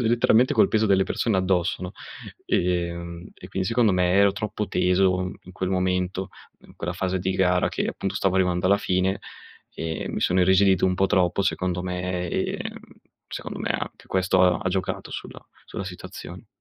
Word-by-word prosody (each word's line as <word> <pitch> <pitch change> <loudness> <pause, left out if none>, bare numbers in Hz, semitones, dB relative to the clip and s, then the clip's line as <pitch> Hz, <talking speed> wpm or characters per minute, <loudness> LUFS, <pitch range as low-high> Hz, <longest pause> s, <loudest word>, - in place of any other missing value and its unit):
letteralmente 120 +1 +4
col - - +5
peso 110 0 +2
delle 95 -1 +4
persone 110 0 0
addosso, 95 -1 0
no, 90 +2 -5 0.5
ehm, 85 -1 -1
e - - -12
quindi 95 -1 -2
secondo 115 -4 +3
me 90 -1 +2
ero 100 0 +5
troppo 105 -1 -4
teso 90 0 +2
in 90 - -13
quel 95 0 -3
momento, 90 0 0 0.3
in - - -18
quella 85 +1 -3
fase 95 +1 -1
di 95 +1 -1
gara 90 -1 +2
che - - -2
appunto - - -3
stavo 95 -1 +1
arrivando 90 -1 +1
alla 100 +2 +5
fine, 95 0 0 0.6
e 80 -1 -4
mi - - -3
sono 90 +1 +2
irrigidito 95 0 +4
un 90 - +1
pò 95 - +2
troppo, 95 +1 +2
secondo 90 -1 -1
me, 90 -1 -3
ehm, - - -3 0.5
secondo - - -6
me - - -3
anche - - -4
questo 95 0 +2
ha 90 -2 +4
ha 95 - 0
giocato 95 0 -3
sulla - - -8 0.2
sulla 100 - -5
situazione. 90 -1 -9
95 Hz, 175 wpm, -24 LUFS, 90-95 Hz, 0.6 s, col